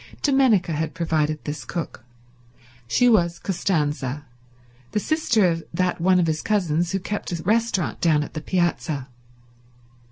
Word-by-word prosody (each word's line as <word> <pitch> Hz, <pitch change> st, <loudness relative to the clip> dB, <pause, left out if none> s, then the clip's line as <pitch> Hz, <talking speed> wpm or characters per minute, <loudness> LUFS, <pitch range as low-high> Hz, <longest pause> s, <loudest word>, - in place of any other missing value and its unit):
Dominica 260 Hz, -, +3 dB
had 160 Hz, +1 st, -2 dB
provided 155 Hz, -2 st, 0 dB
this 145 Hz, -2 st, -5 dB
cook. 165 Hz, -2 st, -5 dB, 0.8 s
She 245 Hz, -, +3 dB
was 170 Hz, -7 st, +3 dB
Costanza, 150 Hz, -7 st, -1 dB, 0.7 s
the -, -, +2 dB
sister 240 Hz, -, +2 dB
of 165 Hz, -1 st, -1 dB
that 180 Hz, -1 st, 0 dB
one 185 Hz, +1 st, +4 dB
of 175 Hz, -, +3 dB
his 155 Hz, -1 st, -1 dB
cousins 175 Hz, -5 st, 0 dB
who 195 Hz, -, 0 dB
kept 205 Hz, +1 st, -4 dB
a 170 Hz, -2 st, -4 dB
restaurant 220 Hz, -3 st, 0 dB
down 155 Hz, -3 st, +3 dB
on -, -, -8 dB
the 155 Hz, -, -4 dB
piazza. 160 Hz, -6 st, -1 dB
170 Hz, 140 wpm, -23 LUFS, 155-195 Hz, 0.8 s, one